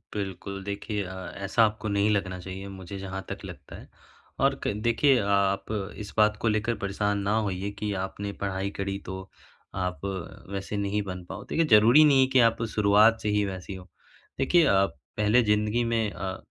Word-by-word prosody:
बिल्कुल, 100 0 -5
देखिए 100 +1 -3
अ, 95 -1 -7
ऐसा 100 +4 +2
आपको 110 0 -3
नहीं 100 +1 +2
लगना 95 -3 -1
चाहिए 95 +2 -7
मुझे 95 0 -8
जहाँ 95 0 -5
तक - - -5
लगता - - -10
है - - -12 0.5
और 135 0 +3
क - - 0
देखिए 125 +3 +4
आप 100 -1 +1 0.3
इस 105 -2 -8
बात 105 0 +4
को 115 - +1
लेकर 110 +2 +1
परेशान 100 +1 -1
ना 100 +2 0
होइए 95 +1 -2
कि 105 -1 -2
आपने 100 +1 -5
पढ़ाई 95 0 -2
करी 100 0 -3
तो 95 0 -7 0.5
आप 90 -1 -3 0.5
वैसे 100 +1 -4
नहीं 100 +1 0
बन 90 -2 -6
पाओ, 100 - -6
तो - - -6
ये 165 - +4
ज़रूरी 115 +8 +8
नहीं 140 -3 +5
है 130 - +4
कि 130 - +6
आप 115 -1 +3
शुरुआत 105 +2 +5
से 105 - -1
ही 105 0 +2
वैसी 95 0 -6
हो। 95 0 -11 0.5
देखिए 165 +5 +4
आप 100 -3 +2 0.2
पहले 105 +4 +4
ज़िंदगी 105 +2 +1
में 115 -3 0
अ, 95 +1 -5
100 Hz, 190 wpm, -27 LUFS, 95-105 Hz, 0.5 s, ज़रूरी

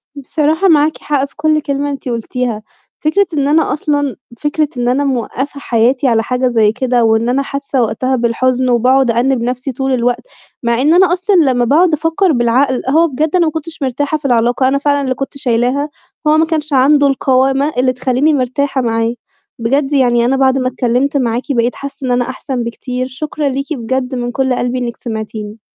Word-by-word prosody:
بصراحة 310 +6 0
معاكِ 310 -1 +3
حق 285 -2 -1
في - - -17
كُلّ 310 0 +1
كلمة 285 0 -2
أنتِ 275 -2 -5
قُلتيها، 235 -1 -3 0.4
فكرة 380 +6 +2
إن 285 -2 0
أنا 310 0 +2
أصلًا 285 -2 -1 0.2
فكرة 300 0 0
إن 245 0 -1
أنا 275 +3 +1
موقّفة 270 +2 -3
حياتي 250 +2 +1
على 225 -2 +2
حاجة 250 0 0
زي 220 -3 +3
كده، 250 0 0
وإن 225 +1 +2
أنا 270 +2 +1
حاسّة 275 -2 -2
وقتها 245 +4 0
بالحُزن 250 +2 0
وباقعد 250 +1 +3
أأنِّب 245 +1 +1
نفْسي 250 +3 -2
طول 265 +1 -2
الوقت، 245 - -1 0.4
مع 235 0 +1
إن 305 +4 +4
أنا 360 -1 +4
أصلًا 370 +2 +1
لمّا 260 -7 +3
باقعد 320 +6 +3
أفكّر 325 +4 +1
بالعقل، 250 +1 +1
هو 325 +4 +4
بجد 305 +4 -1
أنا 345 -2 +3
ما 310 - 0
كنتش 320 0 -6
مرتاحة 275 +4 -1
في 295 - -16
العلاقة، 245 +1 +2
أنا 275 - +2
فعلًا 285 0 +1
اللي 260 -2 -1
كنت 275 +1 -5
شايلاها، 255 +2 0 0.4
هو 305 +1 +4
ما 320 - +3
كانش 310 -2 -2
عنده 285 +2 +4
القوامة 270 +2 +1
اللي 255 0 +2
تخلّيني 255 +4 +1
مرتاحة 270 0 0
معاه، 230 0 0 0.5
بجد 275 +5 0
يعني 240 -3 +3
أنا 265 +2 +1
بعد 265 0 +3
ما 255 - 0
اتكلّمت 255 +3 0
معاكِ 240 -1 -1
بقيت 240 -2 0
حاسّة 275 -1 -7
إن - - 0
أنا 245 0 0
أحسن 260 -1 -4
بكتير، 250 +2 -4
شكرًا 295 +2 -3
ليكِ 275 +3 -3
بجد 255 +1 -3
من 245 0 -3
كُلّ 265 -1 0
قلبي 245 +1 -1
إنك 235 -2 -4
سمعتيني. 220 -2 -6
265 Hz, 190 wpm, -15 LUFS, 245-290 Hz, 0.5 s, إن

